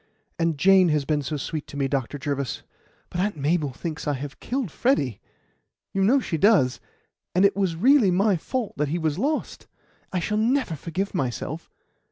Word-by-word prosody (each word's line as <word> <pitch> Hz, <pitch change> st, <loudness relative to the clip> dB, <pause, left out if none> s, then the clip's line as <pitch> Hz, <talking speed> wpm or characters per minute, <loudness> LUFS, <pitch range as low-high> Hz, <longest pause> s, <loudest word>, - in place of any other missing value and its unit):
And 165 Hz, -2 st, +1 dB
Jane 190 Hz, +2 st, +5 dB
has 150 Hz, -2 st, +1 dB
been 150 Hz, 0 st, +1 dB
so 150 Hz, +2 st, -3 dB
sweet 150 Hz, +2 st, -4 dB
to 145 Hz, -, -9 dB
me, 140 Hz, -1 st, +1 dB
Dr. 135 Hz, 0 st, -2 dB
Jervis; 140 Hz, -3 st, -3 dB, 0.5 s
but 175 Hz, -, -3 dB
Aunt 205 Hz, -3 st, -1 dB
Mabel 150 Hz, 0 st, 0 dB
thinks 160 Hz, +4 st, -6 dB
I 145 Hz, -, +2 dB
have 140 Hz, +1 st, -6 dB
killed 250 Hz, -, -3 dB
Freddy 140 Hz, -, 0 dB, 0.7 s
you 195 Hz, -, +1 dB
know 250 Hz, +8 st, +5 dB
she 165 Hz, -10 st, -3 dB
does 190 Hz, -, +4 dB, 0.6 s
and 185 Hz, +2 st, +5 dB
it 200 Hz, -, +3 dB
was 190 Hz, -4 st, 0 dB
really 240 Hz, -, +5 dB
my 195 Hz, +3 st, +3 dB
fault 235 Hz, +7 st, -3 dB
that 150 Hz, +1 st, 0 dB
he 160 Hz, +5 st, -1 dB
was 160 Hz, -1 st, -1 dB
lost. 295 Hz, +5 st, -2 dB, 0.4 s
I 185 Hz, -, -1 dB
shall 210 Hz, +5 st, -1 dB
never 240 Hz, -, +1 dB
forgive 180 Hz, +6 st, -4 dB
myself!" 145 Hz, +1 st, -3 dB
165 Hz, 185 wpm, -25 LUFS, 145-200 Hz, 0.7 s, Jane